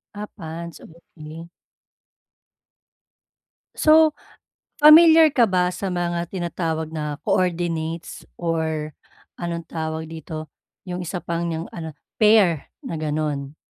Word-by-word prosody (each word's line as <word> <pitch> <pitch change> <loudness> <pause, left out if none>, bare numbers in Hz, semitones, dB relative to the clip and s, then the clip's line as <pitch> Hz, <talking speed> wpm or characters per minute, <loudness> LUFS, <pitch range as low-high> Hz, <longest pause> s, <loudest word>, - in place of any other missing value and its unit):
Ah, 210 - -5
pants. 165 -1 -7
Okey. 165 0 -12 2.3
So, 310 0 +5 0.6
pamilyar 315 0 +8
ka 235 -4 +4
ba 180 -1 +1
sa 195 - -4
mga 175 -1 -2
tinatawag 165 -3 -3
na 150 -2 -4
coordinates, 170 -2 -1 0.2
or 160 -2 -2 0.5
anong 170 -1 -4
tawag 160 0 -4
dito, 160 -1 -7 0.4
yung 180 0 -4
1 180 +1 -4
pang 170 0 -3
niyang 165 0 -3
ano, 160 -2 -6 0.3
pair 205 -8 +4 0.2
na 160 -2 -5
gano'n? 150 -2 -3
170 Hz, 105 wpm, -22 LUFS, 160-180 Hz, 2.3 s, pamilyar